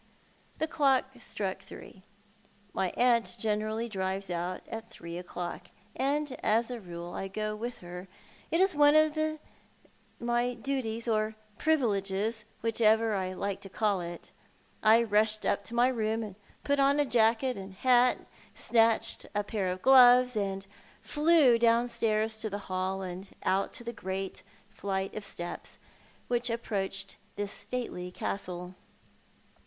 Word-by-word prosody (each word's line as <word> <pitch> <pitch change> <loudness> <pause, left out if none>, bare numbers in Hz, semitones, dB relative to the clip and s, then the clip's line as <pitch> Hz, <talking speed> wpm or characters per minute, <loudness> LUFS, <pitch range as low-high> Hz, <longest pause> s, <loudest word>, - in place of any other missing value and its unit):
The 315 - 0
clock 275 -5 +3
struck 195 -5 -3
three. 190 0 -12 0.7
My 190 -1 0
aunt 240 -2 +3
generally 215 +1 -1
drives 190 -2 -2
out 175 +1 -3
at 225 0 -7
three 170 -6 -8
o'clock, 175 0 -6 0.3
and 280 +1 0
as 230 +3 +2
a 245 - -4
rule 175 -1 -7
I 195 - -4
go 215 +2 -3
with 235 +3 -5
her. 180 +2 -8 0.4
It 330 - +1
is 380 -3 +3
one 290 0 +6
of 310 0 +5 1.0
my 240 +1 0
duties, 235 -2 -3
or 215 -1 +1 0.2
privileges, 215 -6 0 0.2
whichever 225 -1 +3
I 185 -2 -1
like 195 +1 -3
to 195 - -9
call 200 -1 0
it. 170 0 -8 0.5
I 220 +2 +6
rushed 215 0 +1
up 200 - +1
to 235 - -5
my 240 +1 +5
room, 220 -4 -1 0.3
jiut 285 0 +2
on 280 +1 +4
jacket 235 +2 +3
and 195 -1 -8
hat, 250 +3 +3 0.3
snatched 225 -1 +2
a 205 - +1
pair 205 -2 -2
of 185 0 -3
gloves, 250 -1 +7
and 195 -2 -2 0.4
flew 295 -6 +4
downstairs 230 -2 +2
to 220 - -3
the 200 - -3
hall 190 +1 -1
and 185 +1 -6 0.2
out 195 +1 +1
to - - -7
the 235 0 -5
great 190 -3 -4 0.3
flight 195 0 -3
of 215 - -5
steps 175 -3 -6 0.5
which 245 0 0
approaches 195 -4 -3 0.2
this 205 0 -3
stately 230 -8 -4
castle. 180 -1 -4
220 Hz, 140 wpm, -30 LUFS, 195-240 Hz, 1.0 s, gloves